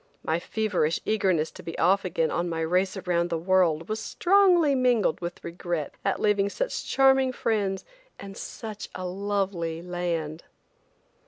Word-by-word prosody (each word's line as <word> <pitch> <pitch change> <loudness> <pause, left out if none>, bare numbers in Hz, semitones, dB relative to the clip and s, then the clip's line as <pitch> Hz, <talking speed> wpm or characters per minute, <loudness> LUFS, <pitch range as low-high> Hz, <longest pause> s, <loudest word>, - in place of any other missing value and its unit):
My 160 +1 0
feverish 185 -5 0
eagerness 190 -7 +1
to - - -11
be 165 - -7
off 190 +4 +3
again 165 -3 0
on 175 0 -1
my 165 -1 -2
race 185 +4 +1
around 175 -2 0
the 165 - -1
world 170 -2 +2
was 215 +1 -2
strongly 355 - +4
mingled 245 -10 +2
with 175 0 -6
regret 170 -3 -4
at 195 - 0
leaving 205 -1 +2
such - - -3
charming 265 -1 +4
friends 205 -6 -1 0.3
and 195 0 -9
such 215 0 -7
a 185 - -5
lovely 190 -3 -2
land. 170 -3 -3
185 Hz, 150 wpm, -26 LUFS, 170-215 Hz, 0.3 s, strongly